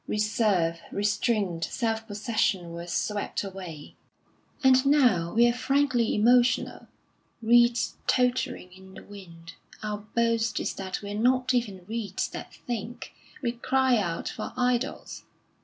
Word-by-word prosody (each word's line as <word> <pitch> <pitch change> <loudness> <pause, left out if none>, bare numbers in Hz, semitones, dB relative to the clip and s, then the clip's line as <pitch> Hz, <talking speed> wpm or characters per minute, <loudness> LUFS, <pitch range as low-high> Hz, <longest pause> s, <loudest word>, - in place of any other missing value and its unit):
Reserve, 205 -6 +1
restraint, 205 -4 0
self 225 +1 -2
possession, 205 -4 -1
were 170 +1 -7
swept 205 +4 -2
away... 185 -6 -8 0.7
And 260 -1 +6
now 245 - +3
we 235 +1 +6
are 240 - +2
frankly 255 -2 +1
emotional; 245 +3 +2 0.5
reeds 240 +1 +3
tottering 250 -6 0
in 190 0 -15
the - - -11
wind, 170 -5 -12 0.3
our 210 -1 -3
boast 230 +1 0
is - - -2
that 190 +1 -5
we 200 - -5
are 205 - -3
not 255 +2 +2
even 205 -7 -2
reeds 215 -2 -3
that - - -8
think; 240 0 -5 0.3
we 235 - +1
cry 260 +1 +2
out 170 -5 -2
for - - -5
idols. 250 +1 -1
220 Hz, 130 wpm, -27 LUFS, 195-245 Hz, 0.7 s, And